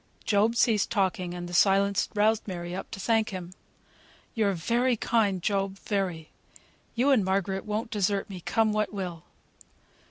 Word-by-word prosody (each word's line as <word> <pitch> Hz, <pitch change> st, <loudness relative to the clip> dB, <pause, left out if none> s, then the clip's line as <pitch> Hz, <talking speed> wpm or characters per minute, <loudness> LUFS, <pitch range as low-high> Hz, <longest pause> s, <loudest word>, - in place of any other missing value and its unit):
Job 215 Hz, +2 st, +2 dB
ceased 225 Hz, -3 st, +2 dB
talking, 185 Hz, -4 st, -1 dB
and 175 Hz, 0 st, -6 dB
the 175 Hz, -, -9 dB
silence 195 Hz, +2 st, +3 dB
roused 215 Hz, +1 st, +2 dB
Mary 175 Hz, -2 st, -5 dB
up 190 Hz, -, -6 dB
to -, -, -7 dB
thank 220 Hz, +2 st, +1 dB
him. 185 Hz, -2 st, -7 dB, 0.8 s
"You're 210 Hz, -3 st, +1 dB
very 235 Hz, +8 st, +1 dB
kind, 205 Hz, -6 st, +1 dB
Job; 195 Hz, -1 st, -1 dB
very. 185 Hz, -7 st, -3 dB, 0.6 s
You 255 Hz, +4 st, +3 dB
and 245 Hz, -7 st, +4 dB
Margaret 190 Hz, 0 st, -1 dB
won't 215 Hz, +2 st, -3 dB
desert 200 Hz, -1 st, 0 dB
me, 190 Hz, -3 st, -8 dB
come 220 Hz, +5 st, +1 dB
what 215 Hz, 0 st, 0 dB
will." 180 Hz, -4 st, -5 dB
200 Hz, 155 wpm, -27 LUFS, 185-220 Hz, 0.8 s, and